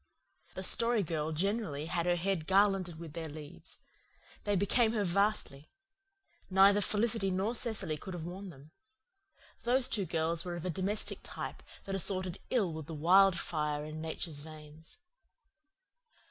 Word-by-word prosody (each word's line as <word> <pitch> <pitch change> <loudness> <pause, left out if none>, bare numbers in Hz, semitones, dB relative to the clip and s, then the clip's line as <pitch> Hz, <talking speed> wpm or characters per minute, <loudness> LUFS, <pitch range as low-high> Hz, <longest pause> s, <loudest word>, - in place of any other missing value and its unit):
The - - -4
Story 230 -2 +2
Girl 160 -2 -2
generally 170 -3 -1
had 170 +1 -1
her 175 - +4
head 175 -2 -1
garlanded 195 -3 +3
with 165 -2 -9
their 160 -1 -4
leaves. 145 - -9 0.7
They 205 -1 +2
became 220 +4 +3
her 215 -3 +1
vastly. 190 -6 0 0.8
Neither 195 +2 +6
Felicity 210 0 +1
nor 190 +5 0
Cecily 220 -10 -1
could 185 +4 -7
have 170 - -5
worn 185 +3 -6
them. 145 -1 -14 0.9
Those 250 +2 +4
two 200 -5 0
girls 165 0 0
were 175 -2 -4
of 170 - -6
a 180 - 0
domestic 195 +5 0
type - - -6 0.2
that 195 - -5
assorted 185 -1 -1
ill 205 -10 +1
with 155 -2 -7
the 160 - -6
wildfire 160 -3 +3
in 155 +1 -6
Nature's 160 -1 -4
veins. 155 +1 -12
180 Hz, 145 wpm, -32 LUFS, 160-200 Hz, 0.9 s, Neither